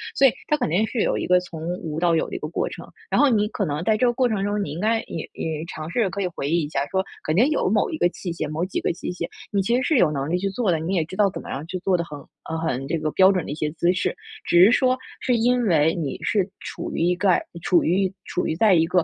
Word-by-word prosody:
所 275 - +5
以 250 - +3 0.2
他 300 - +3
肯 250 - -1
定 185 +7 +2
是 235 - -2
有 - - +1
一 - - -2
个 180 0 +5
从 165 -3 -9 0.2
无 155 -1 -4
到 170 -1 +3
有 160 - 0
的 - - -6
一 - - -3
个 155 - -4
过 165 - -2
程， - - -9 0.2
然 - - +2
后 290 - +6
你 210 -3 +2
可 205 - -2
能 150 0 -2
在 215 +3 +2
这 250 - +2
个 240 - +3
过 250 0 +2
程 205 -3 -1
中， 205 0 0
你 145 - -5
应 155 - -5
该 225 +3 +1
也 165 - -6
也 160 -1 -4
尝 155 -2 -7
试 205 +2 +1
可 200 +2 -4
以 185 - 0
回 150 -5 -4
忆 170 +1 +2
一 145 - -4
下 140 -2 -1
说， 190 +3 0 0.2
肯 155 - -1
定 235 +9 +5
有 305 - +1
某 210 +1 +2
一 320 - -4
个 175 - +3
器 175 0 -6
械、 155 -2 -3
某 155 +3 -2
几 185 - -3
个 - - 0
器 - - -5
械， 180 - -4 0.2
你 200 - +2
其 235 +5 +1
实 255 - +2
是 310 +1 +2
有 175 -9 +4
能 140 0 -2
力 175 - +1
去 195 - -1
做 200 -1 0
的， 165 - +2
你 165 +5 -2
也 170 - +2
知 185 - -9
道 200 0 +3
怎 - - -6
么 - - -10
样 140 +3 -4
去 185 +2 -4
做 185 0 +1
的 170 - -1
很， 150 -3 -8 0.3
呃， 160 - -2
很 135 -5 -2
这 165 - 0
个 155 - -1
标 190 +3 +6
准 185 -3 0
的 - - -5
一 145 - -3
些 155 -1 -1
姿 170 +2 +1
势。 190 - -1 0.3
只 175 +1 +6
是 205 - +7
说， 255 0 +3 0.2
是 250 - +1
因 245 +2 +2
为 160 -4 +3
你 150 -6 -3
是 200 -4 +1
处 - - -6
于 - - -3
一 175 +1 +2
个 185 -1 +2 0.2
处 175 - +3
于 185 +2 +1
处 180 - -2
于 160 - -1
在 210 +2 +4
一 165 -1 +4
个， 180 +1 +2
180 Hz, 335 characters per minute, -23 LUFS, 160-210 Hz, 0.3 s, 是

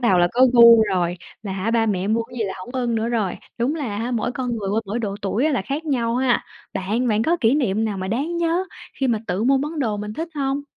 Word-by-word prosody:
đầu 195 -7 +3
là 175 0 +4
có 255 +2 +5
gu 235 -2 +8
rồi, 180 -4 0 0.3
là 200 - -4
hả 195 +4 -2
ba 230 -1 +2
mẹ 195 -2 0
mua 225 +2 +2
cái 245 +2 -10
gì 225 - 0
là 190 - -4
hổng 185 - -9
ưng 245 -3 -1
nữa 225 +1 0
rồi, 215 -6 -1 0.2
đúng 255 +7 +1
là 240 -10 -3
hả 235 +3 -2
mỗi 240 0 -1
con 245 -2 -3
người 200 -3 -4
qua 220 +2 +1
mỗi 210 +4 -2
độ 205 -4 -3
tuổi 205 +6 0
á 310 - +1
là 240 - 0
khác 285 +8 -4
nhau 240 -5 0
ha? 255 -1 +1 0.3
Bạn, 220 +6 -1
bạn 215 0 +2
có 335 +7 +2
kỷ 225 +2 +4
niệm 225 -7 +1
nào 205 -3 -2
mà 185 0 -4
đáng 290 +10 -1
nhớ 340 +2 +1 0.4
khi 270 - +2
mà 230 -3 +1
tự 185 +5 -1
mua 270 +2 +4
món 300 +3 -4
đồ 220 -6 0
mình 210 +1 -5
thích 325 +7 -4
hông? 275 0 -1
230 Hz, 280 wpm, -22 LUFS, 210-260 Hz, 0.4 s, gu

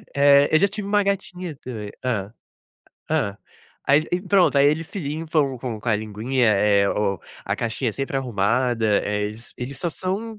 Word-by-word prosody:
Eh, 140 0 +6
eu 155 - +5
já 200 - +4
tive 200 0 -5
uma 205 0 +3
gatinha 185 -4 -3
também 110 -6 -7
hã. 105 -5 -2 0.8
Hã. 100 0 0 0.5
Aí 145 +2 +6
e - - +4
e 180 - -7
pronto, 190 -6 +3
aí 140 +1 +6
eles 155 +2 +1
se 200 - -7
limpam 150 -3 -1
com 115 -3 -5
com 120 - -4
a 110 - +4
linguinha, 110 +4 -1
eh, 100 0 +3
oh, 100 -3 0 0.3
a - - -1
caixinha 115 0 -2
sempre 135 +2 -3
arrumada, 120 0 +1 0.2
eh, 105 0 -1
eles 110 +3 -7
eles 130 +2 -6
só 170 - -1
são 205 +6 -4
135 Hz, 185 wpm, -23 LUFS, 110-165 Hz, 0.8 s, Eh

